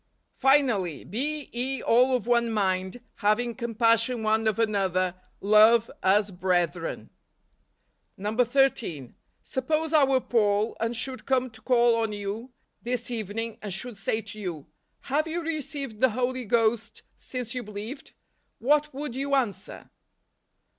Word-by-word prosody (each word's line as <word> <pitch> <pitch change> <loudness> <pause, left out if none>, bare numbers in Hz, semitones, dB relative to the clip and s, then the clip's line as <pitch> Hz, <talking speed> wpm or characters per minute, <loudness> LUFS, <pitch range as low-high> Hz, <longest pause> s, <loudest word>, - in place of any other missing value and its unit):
" - - -48
Finally, 245 - +2
be 290 - -3
ye 260 +3 -1
all 250 +3 +4
of 250 - -2
one 235 -1 +2
mind, 190 +1 -1 0.2
having 230 +3 +1
com¬ 235 -2 -6
passion 230 0 +3
one 220 +1 +2
of 220 - +1
another, 190 -5 +1 0.3
love 215 +3 +5
as 200 +2 +3
brethren 175 -2 -1 0.6
." - - -36
13. 225 - +1 0.3
Suppose 310 +4 -1
I 305 -2 +6
were 265 -1 +3
Paul, 215 -3 +1
and 230 +1 -1
should 255 +2 -4
come 255 -2 +1
to 220 -1 -16
call 240 -1 +4
on 225 -2 -1
you 205 +5 -5 0.3
this 245 0 -3
evening, 225 0 -4
and 205 - -5
should 225 +5 -5
say 210 +3 -1
to 215 0 -10
you, 170 -8 -5 0.2
" - - -48
Have 295 +4 0
you 335 +1 -3
received 285 -7 -4
the 260 - +6
Holy 250 +2 -2
Ghost 225 0 0 0.2
since 250 -3 -5
you 250 - -3
believed? 215 +6 -8 0.2
" - - -47
what 300 +4 +2
would 280 -3 -5
you 280 +1 0
answer 240 -7 -3
230 Hz, 150 wpm, -26 LUFS, 210-255 Hz, 0.6 s, I